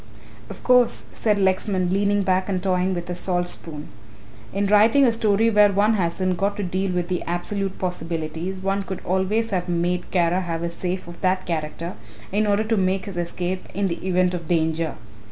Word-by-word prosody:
"Of - - -9
course," 250 -1 +3
said 210 -2 +1
Lexman, 190 -1 +1
leaning 200 0 +2
back 185 0 +1
and 185 -2 -1
toying 185 0 +1
with 175 0 -5
a - - -1
salt 175 0 -1
spoon, 150 -4 -5 0.6
"in 200 +1 0
writing 215 +7 +5
a 240 - +4
story 225 0 +2
where 210 -1 +6
one 205 +3 +3
hasn't 185 -1 0
got 200 +2 0
to 205 - -2
deal 185 +1 -1
with 180 -1 -1
the 180 -1 -1
absolute 190 +3 -2
possibilities, 170 0 -3
one 195 +1 0
could 190 -1 -6
always 195 +5 0
have 180 -2 -1
made 175 +1 -1
Kara 175 0 +2
have 170 -2 -3
a 170 - -2
safe 180 +1 -4
of 170 0 -11
that 185 0 +1
character 165 +1 -3 0.4
in 210 +2 +1
order 205 +1 +2
to 225 0 0
make 190 0 +1
his 200 - -7
escape 175 +1 -3
in 195 0 0
the 170 - -4
event 185 -1 +2
of 170 -3 -5
danger. 160 -1 0
185 Hz, 190 wpm, -23 LUFS, 175-200 Hz, 0.6 s, where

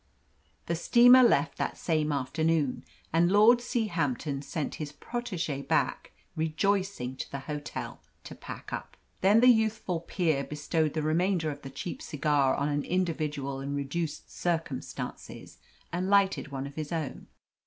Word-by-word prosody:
The 170 - -1
steamer 245 +9 +7
left 190 - +3
that - - -2
same 155 -2 0
afternoon, 150 +1 0 0.3
and 170 +2 +4
Lord 215 +4 +6
Seahampton 165 - -1
sent 150 0 -3
his 150 -1 -4
protege 175 - -4
back - - 0 0.2
rejoicing 160 -3 0
to - - -5
the 140 - -5
hotel 150 +1 -6 0.2
to - - -9
pack - - -9
up. - - -6 0.2
Then 205 +4 +5
the 250 - +6
youthful 220 -6 +2
peer 160 -4 0
bestowed 150 +1 -1
the 155 - 0
remainder 165 +1 +1
of 145 0 -9
the 135 - -8
cheap 140 +6 -6
cigar 145 -2 +1
on 140 - 0
an 145 -1 0
individual 150 -6 -2
in 140 +1 -3
reduced 145 +3 -3
circumstances 165 -6 -4 0.3
and 180 +2 -1
lighted 200 -5 +3
one 135 -1 -5
of 140 - -8
his 155 0 -5
own. 160 -5 -4
160 Hz, 145 wpm, -29 LUFS, 145-185 Hz, 0.3 s, steamer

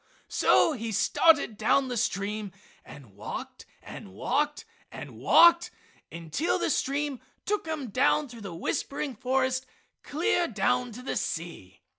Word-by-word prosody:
So - - +4
he 230 -5 -4
started 285 - +3
down 265 +5 +2
the 250 - -3
stream 205 -1 -2 0.3
and 125 -8 -14
walked 105 - -7 0.2
and 95 - -10
walked 295 - -1 0.3
and - - -9
walked 340 0 +6 0.4
until 170 - -2
the - - 0
stream 280 -1 -1 0.3
took 415 -5 -1
him 295 -8 -4
down 280 +6 +2
through 235 -3 -12
the 195 -5 -7
whispering 275 - -3
forest 260 +2 0 0.3
clear 345 +3 0
down 245 +3 0
to 250 +3 -9
the - - -3
sea. 95 - -5
250 Hz, 135 wpm, -27 LUFS, 200-295 Hz, 0.4 s, walked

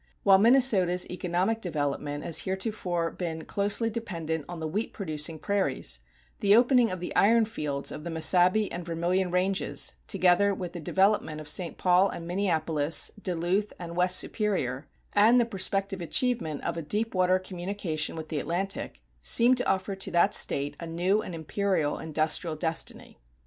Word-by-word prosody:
While 195 -1 +6
Minnesota's 210 -7 +4
economic 180 +5 -1
development 145 -4 -3
has 165 - +1
heretofore 190 -4 -2
been 165 -3 -5
closely 205 +3 0
dependent 165 -9 -4
on 175 -1 -6
the 160 - -3
wheat 205 +8 -3
producing 160 -4 -1
prairies, 155 - -1 0.4
the 200 0 +4
opening 245 0 +4
of 185 - -5
the 180 - -5
iron 225 +3 +4
fields 145 -10 -4
of 150 - -7
the 170 - -5
Mesabi 180 +5 +4
and 175 - -5
Vermilion 175 +3 -1
ranges, 185 +2 0
together 195 +1 +3
with 180 -2 -6
the 175 - -6
development 190 -2 +1
of 155 - -9
St. 170 +3 -1
Paul 185 +2 +3
and 170 - -7
Minneapolis, 165 -4 0
Duluth 185 +3 -1
and 170 -1 -7
West 180 +1 +3
Superior, 155 - -2 0.3
and 220 +4 +5
the 240 - +3
prospective 195 -2 -1
achievement 175 - 0
of 170 0 -3
a - - -2
deep 210 +9 -2
water 185 0 +3
communication 180 -4 -3
with 160 -1 -7
the 155 - -2
Atlantic, 190 +6 -3 0.2
seem 240 +2 +4
to 250 - -1
offer 195 +1 -1
to 190 - -4
that 175 - +3
State 140 +1 +1
a 170 - -6
new 180 +6 +1
and 180 - -7
imperial 165 -1 -1
industrial 160 +1 0
destiny. 160 +1 -3
180 Hz, 160 wpm, -27 LUFS, 160-200 Hz, 0.4 s, While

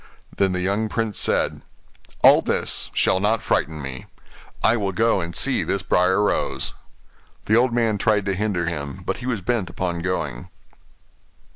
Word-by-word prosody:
Then 95 -1 +1
the 90 - -2
young 100 +4 0
prince 110 -3 -2
said, - - +1 0.6
'All - - +8
this - - -1
shall 95 - +2
not 105 +2 +1
frighten 75 0 -1
me; 65 -1 -7 0.6
I 110 - +4
will 100 -4 -2
go 115 0 +2
and 85 0 -6
see - - +2
this - - -2
Briar 95 +3 +2
Rose.' 105 - -1 0.7
The 110 - +3
old 125 +2 +3
man 115 -3 +1
tried 105 -2 +2
to 100 - 0
hinder 95 -3 -1
him, 70 -5 -5
but - - -2
he 125 - -7
was 115 -6 -1
bent 105 -2 -1
upon 85 -2 -3
going. 85 -8 -3
95 Hz, 165 wpm, -22 LUFS, 85-110 Hz, 0.7 s, All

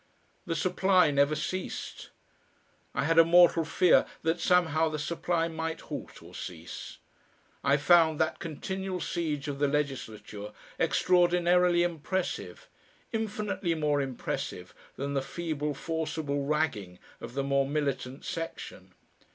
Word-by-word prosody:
The 165 - -1
supply 185 +1 +3
never 140 +2 +3
ceased. 185 +5 -5 0.9
I 125 - +1
had 165 +2 +4
a - - +10
mortal 170 0 +6
fear 175 +2 +4 0.2
that 165 +1 +1
somehow 165 -3 +3
the 155 - -3
supply 165 +2 -1
might 160 0 -4
halt - - -8
or - - -14
cease. 85 -1 -8 0.7
I 140 0 +4
found 160 0 +4
that - - 0
continual 190 +4 -4
siege 155 -5 -2
of 140 -1 -4
the 145 - +3
legislature 110 -8 -3 0.3
extraordinarily 175 0 +3
impressive 175 +2 -3 0.4
infinitely 210 -5 -2
more 150 -2 +1
impressive 130 -3 -4 0.2
than 140 +1 -3
the 135 - +1
feeble 150 0 -3
forcible 155 -3 -2
"ragging" 140 - -1 0.2
of 120 - -9
the 140 - 0
more 140 0 +1
militant 140 -2 -2
section. 165 0 -6
160 Hz, 125 wpm, -29 LUFS, 140-175 Hz, 0.9 s, a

